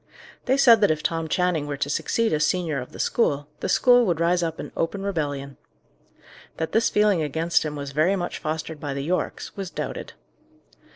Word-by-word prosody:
They 265 +1 +2
said 235 -5 +6
that 205 - +5
if 155 -1 0
Tom 165 -1 -1
Channing 175 -3 0
were 145 -1 -4
to 140 - -1
succeed 225 +9 0
as 150 0 +2
senior 160 -4 0
of 125 - -10
the - - -11
school, 145 -11 0
the - - -3
school 245 -1 +5
would 170 -3 0
rise 175 +1 +2
up 165 -1 -3
in - - -6
open 195 +4 -2
rebellion. 145 -7 -3 1.0
That 160 - -3
this 225 +1 +3
feeling 210 -4 +3
against 160 +3 +1
him 150 -1 -4
was 140 -1 -5
very 155 +7 +2
much 175 -2 -4
fostered 160 0 -4
by 145 -1 -4
the 140 - -3
Yorkes, 180 +5 -3
was 195 -3 -5
doubted. - - -5
165 Hz, 195 wpm, -24 LUFS, 150-190 Hz, 1.0 s, said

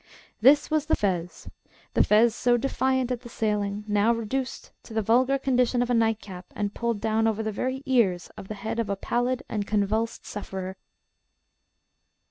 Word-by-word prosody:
This 285 +6 +5
was 310 -1 +1
the - - +3
fez 180 -4 -2 0.5
the - - +4
fez 220 +2 +4
so 245 +1 +2
defiant 260 0 0
at 245 -1 -2
the 240 - -11
sailing, 210 -2 -1
now 210 +2 +3
reduced 235 +3 -3
to 220 - -12
the 220 - +1
vulgar 255 +6 +3
condition 250 -2 +2
of 245 - -2
a - - +3
nightcap, 220 -5 -1
and 205 -1 -2
pulled 235 -2 -1
down 220 +1 +1
over 220 0 0
the 220 - -2
very 260 +5 -3
ears 205 -9 +2
of 190 - -9
the 215 - -5
head 220 +3 -4
of 225 -3 -1
a 200 - 0
pallid 245 +5 -1
and 205 -2 -3
convulsed 215 +2 -1
sufferer. 190 -2 -6
225 Hz, 175 wpm, -26 LUFS, 205-250 Hz, 0.5 s, This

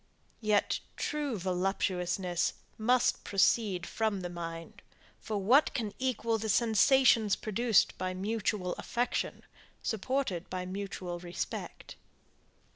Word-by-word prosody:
Yet, 210 -2 +2 0.2
true 295 -6 -2
voluptuousness 180 -1 0 0.3
must 245 +3 +2
proceed 195 -2 +2
from 215 -2 -1
the 175 -1 -5
mind 165 -1 -7 0.4
for 215 - -3
what 240 +10 +4
can 220 -5 -2
equal 230 -3 0
the 220 +1 -3
sensations 225 0 +4
produced 225 0 +2
by 185 0 -2
mutual 200 -2 -1
affection, 245 +1 -2 0.4
supported 220 -5 -1
by 185 0 -3
mutual 185 -2 -5
respect? 175 0 -6
205 Hz, 105 wpm, -31 LUFS, 180-230 Hz, 0.4 s, what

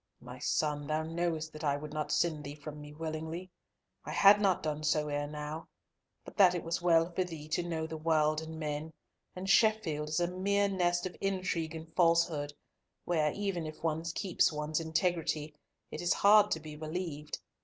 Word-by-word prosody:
"My 125 +1 -10
son, 145 +1 0
thou 155 +1 0
knowest 160 -1 -2
that 155 +1 -8
I 140 -1 +1
would 150 +1 -8
not 150 -1 -2
send 155 -3 +1
thee 145 0 -7
from 150 0 -9
me 150 0 -10
willingly. 160 +3 -5 0.5
I - - -8
had 205 +1 +6
not 195 -3 +2
done 155 -1 -2
so 150 0 +1
ere 145 0 -1
now, 150 +2 -6 0.6
but - - -11
that 185 -3 +6
it 175 - -3
was 165 +1 -2
well 165 0 +4
for 185 +2 0
thee 160 -4 -8
to 155 - +1
know 165 -2 -3
the 160 0 -6
world 155 -1 +2
and 160 0 -7
men, 155 +1 -4 0.4
and 185 +1 -5
Sheffield 195 -8 +3
is 155 - 0
a 175 - +2
mere 200 +3 +1
nest 175 -2 +1
of 185 - -5
intrigue 185 -4 -1
and 160 0 -9
falsehood, 165 -4 +3 0.5
where 155 -3 +2
even 195 -5 -2
if 155 +1 -10
one 160 0 0
keeps 175 +2 +1
one's 150 +1 -2
integrity, 160 -2 -1 0.4
it 155 - -5
is 175 0 +2
hard 210 +1 +6
to 160 - 0
be 155 -1 -9
believed. 155 -1 -4
160 Hz, 190 wpm, -32 LUFS, 150-175 Hz, 0.6 s, had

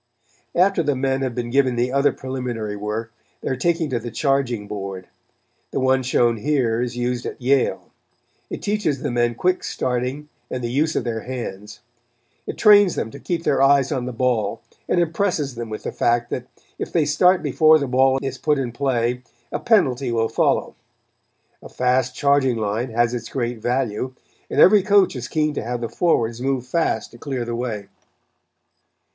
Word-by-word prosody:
After 185 0 +3
the 145 -3 0
men 135 +1 0
have 130 -3 -2
been 120 -1 -3
given 130 -2 +2
the 120 +1 0
other 140 +1 +3
preliminary 125 -5 -4
work 105 +2 -4 0.3
they - - -3
are 130 - 0
taken 165 +4 0
to 120 - 0
the 120 +1 -6
charging 125 -3 0
board. 95 -3 -6 0.6
The - - -2
one 130 0 +3
shown 120 -2 +2
here 120 -2 0
is 120 -1 -3
used 125 0 -1
at - - -7
Yale. 135 +1 0 0.6
It - - -6
teaches 200 -10 -1
the 145 - -1
men 120 -1 +1
quick 180 +8 0
starting 130 +4 -2 0.2
and 125 -1 -4
the 120 - -2
use 155 +5 +1
of - - 0
their 115 -2 -2
hands. 115 -4 -7 0.7
It - - -5
trains 205 -4 +6
them 110 - -3
to 140 - -10
keep 170 +1 -3
their 135 - +2
eyes 135 0 +4
on 130 -4 -1
the 125 - -4
ball 115 -4 -1 0.3
and - - +2
impresses 165 -4 0
them 120 -1 -6
with 110 - -6
the - - -3
fact 120 0 0
that 125 0 -4 0.3
if - - -4
they 165 -4 +2
start 180 +5 +3
before 155 0 +5
the 145 - -2
ball 130 +1 +3
is 135 -1 -4
put 150 -1 +1
in 130 -3 -2
play, 125 -1 0 0.3
a - - -2
penalty 140 - +2
will 115 -1 +1
follow. - - +1 0.9
A - - -11
fast 125 0 0
charging 140 -4 +2
line 110 +3 -2
has 120 +1 +1
its 115 -2 -5
great 120 -2 -3
value, 125 0 -1 0.3
and - - -1
every 205 +1 +7
coach 200 -4 +3
is 125 -1 -5
keen 155 +1 0
to - - -3
have 120 +2 -3
the 115 - -3
forwards 120 -9 0
move 130 -1 -1
fast 125 -5 -1
to 120 - -15
clear 130 -3 -3
the 120 - -4
way. 115 -4 -4
125 Hz, 185 wpm, -22 LUFS, 120-140 Hz, 0.9 s, every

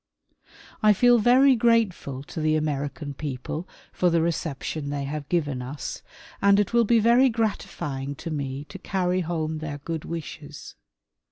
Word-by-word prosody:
I 215 -1 +6
feel 245 +3 +5
very 255 +4 +6
grateful 215 - +1
to 160 - -6
the 155 0 +2
American 145 -1 -2
people 145 +4 -5 0.3
for 180 - +2
the 170 0 +2
reception 155 -2 -3
they 145 -1 -2
have 145 +1 -5
given 145 -7 0
us 130 +3 -6 0.4
and 200 0 +5
it 205 +2 0
will 235 -1 +4
be 235 +2 +4
very 235 +4 +5
gratifying 145 - -3
to 165 - -6
me 140 -1 -4
to 190 - -9
carry 185 -1 0
home 160 -2 -2
their 155 -2 -5
good 160 +2 -5
wishes. 155 -3 -7
160 Hz, 155 wpm, -25 LUFS, 145-205 Hz, 0.4 s, I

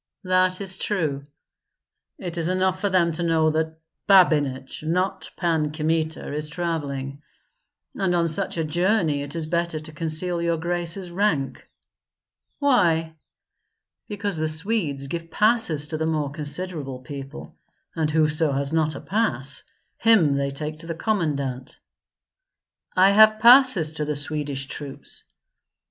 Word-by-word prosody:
"That 185 0 +2
is 190 -1 -2
true." 150 -9 -1 0.9
"It 175 -3 -5
is 165 +1 +2
enough 185 0 0
for 205 - +1
them 175 -3 +3
to 165 +2 -4
know 160 -2 +2
that 160 0 -2 0.3
Babinich, 145 -9 +3
not 185 +4 -1
Pan 160 -4 0
Kmita, 160 -1 -2
is 150 +1 -3
travelling. 145 -4 -4 0.7
And 190 -3 0
on 170 -1 +2
such 175 +3 -2
a 165 - 0
journey 170 -1 +1
it 145 +2 -7
is 165 -2 -3
better 170 0 -1
to 155 +1 -11
conceal 165 +3 -3
your 170 0 0
grace's 175 +2 -4
rank." 170 -8 -1 0.9
"Why?" 170 - +2 0.9
"Because 205 -3 -3
the 155 0 0
Swedes 155 -4 -1
give 165 +3 -5
passes 210 -7 +2
to 155 +1 -4
the 160 - 0
more 150 -3 -1
considerable 150 -2 -4
people; 135 0 -9 0.4
and 160 -2 0
whoso 155 -1 +2
has 140 +2 -1
not 155 -2 +1
a - - -7
pass, 140 - -1 0.4
him 200 -11 +4
they 140 0 0
take 150 +2 -5
to 165 - -12
the 165 - -4
commandant." 145 - -2 1.2
"I 190 +2 +6
have 215 +1 +6
passes 235 - +6
to 155 -1 -3
the 150 0 -2
Swedish 145 -2 -2
troops." 140 0 -8
160 Hz, 140 wpm, -24 LUFS, 150-185 Hz, 1.2 s, I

